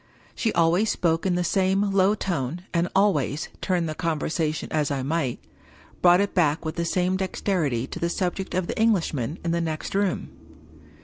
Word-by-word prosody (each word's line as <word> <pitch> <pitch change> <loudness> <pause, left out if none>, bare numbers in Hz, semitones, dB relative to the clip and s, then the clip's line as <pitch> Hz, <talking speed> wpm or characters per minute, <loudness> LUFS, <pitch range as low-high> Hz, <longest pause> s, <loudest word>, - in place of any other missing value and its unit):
She 225 - 0
always 175 +6 +3
spoke 165 +1 +1
in 180 - +1
the 180 - +1
same 195 +3 +1
low 195 +1 +3
tone, 170 -4 -3
and 170 0 +2
always, 175 -7 +1
turn 180 -3 0
the 155 - -3
conversation 155 -1 -1
as 150 -2 +1
I 140 -2 -2
might, 140 -3 -1 0.6
brought, 175 +1 +6
it 200 - -1
back 160 -2 +2
with 155 - -3
the 170 - -1
same 180 +2 +1
dexterity 175 - -1
to - - -7
the 170 - 0
subject 185 +1 -2
of 185 -1 0
the - - -4
Englishman 165 - +1
in 170 - +1
the 170 0 0
next 160 -2 -3
room. 195 -2 0
170 Hz, 180 wpm, -25 LUFS, 155-190 Hz, 0.6 s, brought